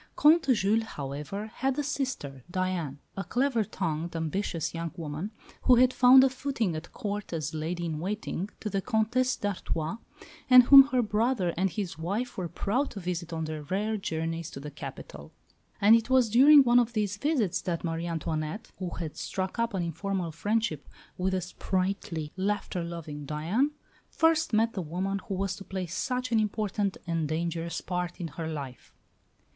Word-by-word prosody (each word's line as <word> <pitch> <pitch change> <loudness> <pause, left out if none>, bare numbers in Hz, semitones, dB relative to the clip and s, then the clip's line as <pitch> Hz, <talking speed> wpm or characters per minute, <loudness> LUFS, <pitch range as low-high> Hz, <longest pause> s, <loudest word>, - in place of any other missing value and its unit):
Comte 315 +1 +5
Jules, 215 -1 +3
however, 150 +1 -5
had 265 +1 -1
a 295 - 0
sister, 260 - -3
Diane, 175 -6 -2 0.2
a 195 - -3
clever 245 -1 +1
tongued, 165 -3 -3
ambitious 165 +1 -2
young 165 -1 -4
woman, 160 +4 -4 0.4
who 255 - +7
had 255 +1 +5
found 255 +1 +8
a 270 - +5
footing 255 - -2
at 155 +2 -7
Court 205 0 -4
as 155 -3 -3
lady 170 +3 -3
in 155 -2 -3
waiting 200 +1 -3
to 215 - -3
the 195 - 0
Comtesse 245 +4 +1
d'Artois, 190 -2 -3 0.5
and 255 -1 +10
whom 275 +2 +10
her 255 -3 +1
brother 210 -4 +1
and 190 +2 +1
his 185 -6 -4
wife 205 +9 -2
were 180 -2 -3
proud 250 - -1
to 205 - -8
visit 175 -2 -4
on 160 -1 -3
their 155 -1 -5
rare 200 +8 -1
journeys 165 -3 -3
to 135 - -8
the 150 +2 -7
capital. 75 - -9 0.5
And 210 +3 +7
it 230 +1 0
was 255 -4 +4
during 280 +5 +8
one 240 -1 +5
of 240 0 0
these 205 -3 -1
visits 260 - 0
that 170 -2 -3
Marie 165 0 -2
Antoinette, 160 +4 -3
who 185 -2 -3
had 160 -3 -5
struck 190 +4 -4
up 230 -2 0
an 180 - 0
informal 170 +1 -2
friendship 205 - -1 0.3
with 190 +1 -1
the 185 - 0
sprightly, 185 -3 -2
laughter 190 -2 -1
loving 155 -4 -7
Diane, 170 - +1 0.4
first 325 0 +2
met 225 +1 +2
the 190 - -3
woman 185 +5 -2
who 195 - -2
was 195 0 -1
to 200 - -9
play 190 -1 -4
such 250 +8 -2
an 225 - +4
important 205 -2 -1
and 165 -3 -1
dangerous 165 +1 -2
part 180 -1 -3
in 170 -2 -4
her 160 +2 -5
life. 140 -5 -7
190 Hz, 175 wpm, -28 LUFS, 165-225 Hz, 0.5 s, and